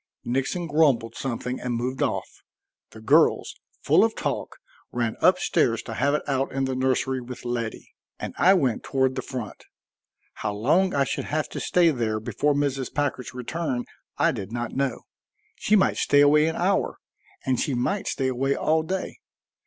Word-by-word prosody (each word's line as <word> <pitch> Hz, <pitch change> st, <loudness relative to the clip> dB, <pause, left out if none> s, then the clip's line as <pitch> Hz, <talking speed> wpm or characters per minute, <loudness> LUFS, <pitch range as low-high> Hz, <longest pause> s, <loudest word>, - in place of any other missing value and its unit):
Nixon 135 Hz, +8 st, -1 dB
grumbled 145 Hz, -7 st, +2 dB
something 125 Hz, 0 st, -4 dB
and 125 Hz, -1 st, -2 dB
moved 125 Hz, +3 st, -3 dB
off. -, -, 0 dB, 0.6 s
The 110 Hz, -, -13 dB
girls, 145 Hz, +8 st, +3 dB, 0.3 s
full -, -, +5 dB
of -, -, +1 dB
talk, -, -, -3 dB, 0.3 s
ran 120 Hz, -2 st, -1 dB
up 180 Hz, 0 st, +5 dB
stairs 115 Hz, -11 st, +1 dB
to 115 Hz, -, -6 dB
have 140 Hz, +6 st, +1 dB
it -, -, -2 dB
out 135 Hz, -1 st, 0 dB
in 135 Hz, 0 st, -1 dB
the 130 Hz, -, -2 dB
nursery 130 Hz, 0 st, 0 dB
with 125 Hz, 0 st, -9 dB
Letty, 120 Hz, -2 st, -4 dB, 0.2 s
and -, -, -6 dB
I 190 Hz, +2 st, +6 dB
went 130 Hz, -, +1 dB
toward 130 Hz, -1 st, +1 dB
the -, -, -3 dB
front. 125 Hz, -5 st, -7 dB, 0.7 s
How 105 Hz, -1 st, -3 dB
long 165 Hz, -, +2 dB
I 140 Hz, -, +3 dB
should -, -, -3 dB
have 155 Hz, 0 st, -2 dB
to -, -, -5 dB
stay 175 Hz, -2 st, +3 dB
there 115 Hz, -5 st, -1 dB
before 145 Hz, +6 st, 0 dB
Mrs. 135 Hz, -3 st, -1 dB
Packard's 140 Hz, -4 st, -2 dB
return 125 Hz, 0 st, -3 dB, 0.3 s
I 170 Hz, -, +3 dB
did 105 Hz, -7 st, -6 dB
not 120 Hz, 0 st, -3 dB
know. 135 Hz, -2 st, -1 dB, 0.5 s
She 215 Hz, -, +2 dB
might 195 Hz, -, +3 dB
stay 145 Hz, 0 st, +4 dB
away 150 Hz, +2 st, +5 dB
an 160 Hz, -, -1 dB
hour 190 Hz, +2 st, 0 dB, 0.5 s
and 130 Hz, -2 st, +1 dB
she 140 Hz, -, 0 dB
might 190 Hz, +12 st, -1 dB
stay 130 Hz, -2 st, 0 dB
away 135 Hz, +2 st, 0 dB
all 160 Hz, +1 st, +2 dB
day. 185 Hz, +4 st, -4 dB
135 Hz, 175 wpm, -25 LUFS, 120-150 Hz, 0.7 s, I